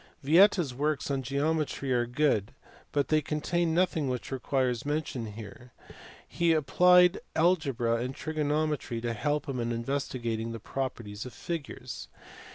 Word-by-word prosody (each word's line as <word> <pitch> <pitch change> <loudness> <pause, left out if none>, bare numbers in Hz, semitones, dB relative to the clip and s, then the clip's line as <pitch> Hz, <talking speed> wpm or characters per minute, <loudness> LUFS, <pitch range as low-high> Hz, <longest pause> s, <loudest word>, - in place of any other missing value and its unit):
Vieta 180 +7 +6
s 135 -5 -6
works 145 +2 -1
on 135 -1 0
geometry 140 0 -1
are 120 -1 +1
good 125 -4 +1 0.4
but 140 -3 0
they 155 0 +3
contain 165 +3 0
nothing 165 -6 +1
which 125 +1 -4
requires 130 -2 0
mention 145 -5 -2
here. 110 +3 -11 0.5
He 170 -1 +2
applied 180 +4 +5 0.2
algebra 140 -9 +2
and 125 +3 -3
trigonometry 150 -5 -1
to 120 0 -2
help 145 +6 -1
him 135 -3 -3
in 120 0 -1
investigating 115 -2 -2
the 115 - -6
properties 115 -3 -5
of 125 - -10
figures. 140 -7 -6
140 Hz, 140 wpm, -29 LUFS, 120-155 Hz, 0.5 s, Vieta